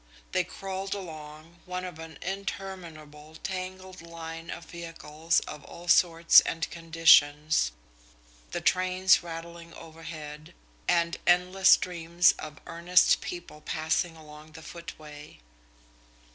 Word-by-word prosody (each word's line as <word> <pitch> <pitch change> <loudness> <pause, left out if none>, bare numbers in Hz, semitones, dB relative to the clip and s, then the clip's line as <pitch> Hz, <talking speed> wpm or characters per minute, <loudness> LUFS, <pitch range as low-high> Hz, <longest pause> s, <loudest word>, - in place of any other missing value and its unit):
They 185 -1 +2
crawled 195 +2 -5
along, 160 -2 -10
one 180 0 -4
of 175 -3 -8
an 160 -2 -9
interminable, 170 -6 -7
tangled 185 0 -6
line 165 0 -8
of 170 - -7
vehicles 165 -1 -2
of 150 - -9
all 175 +1 -12
sorts 165 -1 +6
and 165 0 -2
conditions, 155 - +4 0.8
the - - -4
trains 185 +1 +3
rattling 170 0 -9
overhead, 155 -2 -10 0.3
and 170 -1 +2
endless 180 +2 +4
streams 175 0 +4
of 150 -2 -8
earnest 175 +2 +3
people 175 -3 -8
passing 160 +2 -1
along 155 0 -14
the 160 0 -11
footway. 155 -3 -10
165 Hz, 110 wpm, -28 LUFS, 155-180 Hz, 0.8 s, sorts